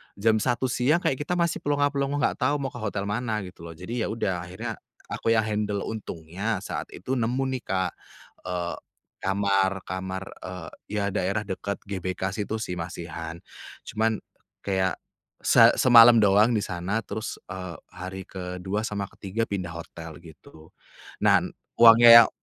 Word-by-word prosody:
jam 110 +2 +2
01:00 125 +3 0
siang, 150 +8 +2
kayak 130 - +1
kita 150 +5 -2
masih 170 -1 0
plonga 145 -1 +1
plongo 140 0 -1
nggak - - 0
tahu 140 +3 +2
mau 135 -2 -3
ke 125 - -8
hotel 105 -2 -2
mana 105 +1 -2
gitu 90 -2 -10
loh. 80 - -9
Jadi 110 +9 -5
ya - - -2
udah 100 -5 -1
akhirnya 90 +1 -6 0.3
aku 115 - +1
yang 110 - +3
handle 105 -1 -1
untungnya 100 0 -4
saat - - -4
itu 125 +8 -2
nemu 120 +4 0 0.2
nih - - -30
Kak, 95 -1 0 0.6
eee, 90 -1 -2 0.4
kamar 95 -1 +1
kamar, 95 +1 -4 0.2
eee, 90 -2 -7 0.3
ya - - 0
daerah 100 +1 -1
dekat 100 0 -5
GBK 95 -1 -3
situ 105 +2 -3
sih 90 -5 -4
masihan. 85 0 -6 0.5
Cuman 110 0 -1 0.4
kayak 95 -2 0 0.5
se - - +6
semalem 115 -2 +8
doang 105 +4 +5
di 105 - 0
sana 95 +5 -2
terus, 110 +2 -5 0.2
eee, 90 -2 -6 0.2
hari 95 +1 -7
ke-2 95 +4 -4
sama 100 -2 -3
ke-3 100 +3 -3
pindah 90 -6 -4
hotel 85 -1 -9
gitu. 80 -1 -15 0.5
Nah - - +4
n - - -6 0.2
uangnya 115 0 +8
yang - - -1
100 Hz, 160 wpm, -26 LUFS, 90-115 Hz, 0.6 s, semalem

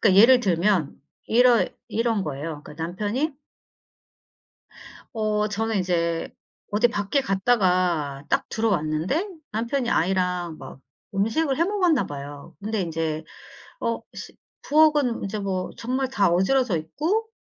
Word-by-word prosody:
그니까 195 -4 +4
예를 250 +3 +7
들면 180 - +1 0.3
이러 240 0 +5 0.2
이런 225 -2 0
거예요. 150 +1 -5
그니까 - - -11
남편이 210 - -2 1.8
어 215 -1 0
저는 220 +1 -1
이제 170 -2 0 0.4
어디 215 +3 +3
밖에 205 +4 0
갔다가 180 - +1
딱 - - +1
들어왔는데 195 - 0 0.3
남편이 235 +4 -1
아이랑 180 -2 0
막 - - -11 0.3
음식을 245 +9 +1
해 335 - +3
먹었나 360 -7 +2
봐요. 145 0 -8
근데 215 0 -1
인제 160 -2 -2 0.6
어 230 - -1
시 - - -9 0.3
부엌은 295 -5 +3
이제 205 +2 -3
뭐 190 -2 -2
정말 255 +2 -1
다 205 -8 +2
어질러져 190 +4 +2
있고 320 - -1
205 Hz, 260 characters per minute, -24 LUFS, 170-245 Hz, 1.8 s, 예를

